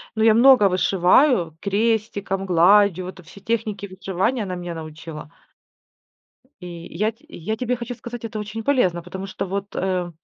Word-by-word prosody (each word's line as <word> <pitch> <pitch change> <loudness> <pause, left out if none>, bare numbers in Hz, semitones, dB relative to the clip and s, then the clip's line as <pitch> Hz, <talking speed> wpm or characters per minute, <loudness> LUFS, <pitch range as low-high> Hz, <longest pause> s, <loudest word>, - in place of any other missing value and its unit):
Ну 220 - +1
я 225 - +6
много 235 -3 +6
вышиваю 185 - +3
крестиком, 205 -2 -1
гладью, 185 +1 +4
в - - -6
это 185 -1 -12
все 185 +4 -15
техники 215 -2 -2
вышивания- 195 +5 -2
она 185 -2 -4
меня 175 -1 -6
научила. 155 -1 -9 1.3
И 180 - -8 0.3
я 215 +4 +1
те 225 - -29
я 215 +7 -4
тебе 250 +1 -1
хочу 240 +1 -6
сказать, 240 0 -9
это 220 -1 -5
очень 215 +2 -5
полезно. 185 -12 +1
Потому 190 +2 -7
что 195 - -5
вот, 200 +2 -5
э, 185 -2 -1
195 Hz, 165 wpm, -22 LUFS, 180-220 Hz, 1.3 s, я